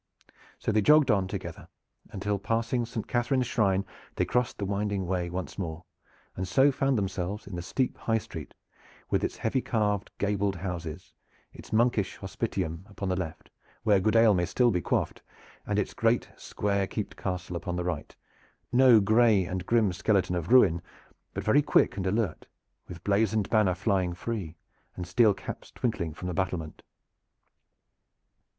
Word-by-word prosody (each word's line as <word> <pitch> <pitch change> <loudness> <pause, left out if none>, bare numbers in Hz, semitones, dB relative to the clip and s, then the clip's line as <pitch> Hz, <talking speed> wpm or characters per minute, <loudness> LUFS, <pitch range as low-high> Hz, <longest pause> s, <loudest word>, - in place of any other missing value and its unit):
So - - -1
they 110 0 +3
jogged 150 +3 +6
on 100 -3 +2
together - - -6 0.4
until 100 +1 -2
passing 115 +3 -1
Saint 115 -2 -5
Catherine's 125 +1 +1
shrine 100 -5 +1 0.3
they - - +1
crossed 125 -1 0
the 100 - -2
winding 100 -1 -1
Wey 90 -1 -1
once 90 +2 -5
more, 85 -2 -4 0.5
and 95 0 -3
so 135 +10 +4
found 135 -1 +1
themselves 95 0 -3
in 100 - -7
the 85 - -4
steep 125 +8 -1
high 115 -1 +1
street 80 -8 -8 0.6
with - - +1
its - - -2
heavy 125 +4 0
caved 105 -4 0
gabled 100 -1 0
houses, 85 -2 -6 0.4
its - - -13
monkish 110 -3 +2
hospitium 80 +3 -3
upon 100 -2 -4
the 95 - +1
left, 85 -4 -6 0.3
where 105 -3 +4
good 110 +4 +1
ale 115 -2 +6
may 90 -2 +1
still 120 +6 +3
be 90 -3 0
quaffed, - - -1 0.5
and - - 0
its - - -1
great - - +1
square 100 -1 -1
keeped 105 +1 -4
castle 90 -1 -4
upon 90 +1 -3
the 90 - -2
right, 85 -4 -4 0.6
no 125 -2 +7
gray 110 -1 +4
and 90 0 -4
grim 110 -5 +3
skeleton 95 -1 +1
of 85 +3 -3
ruin, 95 -10 +6 0.5
but - - -3
very 140 +7 +4
quick 145 - +3
and 95 -1 -2
alert, 105 -3 -1 0.4
with 85 -2 -10
blazoned 105 0 +1
banner 105 -5 +3
flying 95 -3 0
free, 95 -5 -4 0.4
and 90 - -5
steel 100 +3 +4
caps - - -8
twinkling 100 -9 -2
from 85 +4 -7
the 90 - -2
battlement. 85 -3 -3
100 Hz, 165 wpm, -28 LUFS, 90-115 Hz, 0.6 s, no